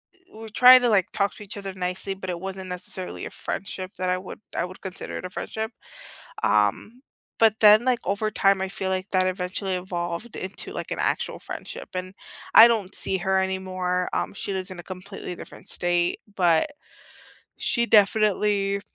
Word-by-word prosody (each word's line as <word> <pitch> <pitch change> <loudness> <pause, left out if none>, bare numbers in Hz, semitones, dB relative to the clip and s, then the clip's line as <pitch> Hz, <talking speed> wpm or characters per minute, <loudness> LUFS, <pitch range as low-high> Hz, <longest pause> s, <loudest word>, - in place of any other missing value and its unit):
Eh, - - -29 0.2
we 220 - -12
were 225 - -8
trying 250 +3 +8
to, 245 - +2
like, 195 -4 +2
talk 200 0 0
to - - -9
each 205 0 -7
other 195 -1 -5
nicely, 185 +1 -3
but 190 -1 -7
it 175 -1 -3
wasn't 190 0 -6
necessarily 180 0 -5
a - - -5
friendship 190 -1 -5
that 185 0 -1
I 180 - +1
would 185 0 -9 0.2
I - - 0
would 185 +1 -11
consider 190 -2 -6
it - - -6
a - - -5
friendship. 220 +4 -4 0.7
Um, 105 - +1 0.4
but 220 -1 +4
then, 215 +2 +7
like, 250 -2 +2
over 215 +2 -1
time, 195 -2 +3
I 190 - -1
feel 190 0 -3
like 190 +1 -2
that 185 -1 +3
eventually 185 +1 -2
evolved 175 +3 -4
into, 190 +1 -5
like, - - -5
an - - -2
actual - - 0
friendship. - - -7
And 185 +1 -5 0.4
I 230 - +12
don't 210 -5 -1
see 190 - 0
her 190 +2 +1
anymore; 185 -1 -2
um, - - -1
she 200 0 -4
lives 190 0 -4
in 185 - -8
a - - -8
completely 185 -1 -7
different - - -11
state, 175 0 +1 0.2
but 170 - +3 0.9
she 235 - +1
definitely, 205 -1 +3
190 Hz, 190 wpm, -25 LUFS, 185-205 Hz, 0.9 s, I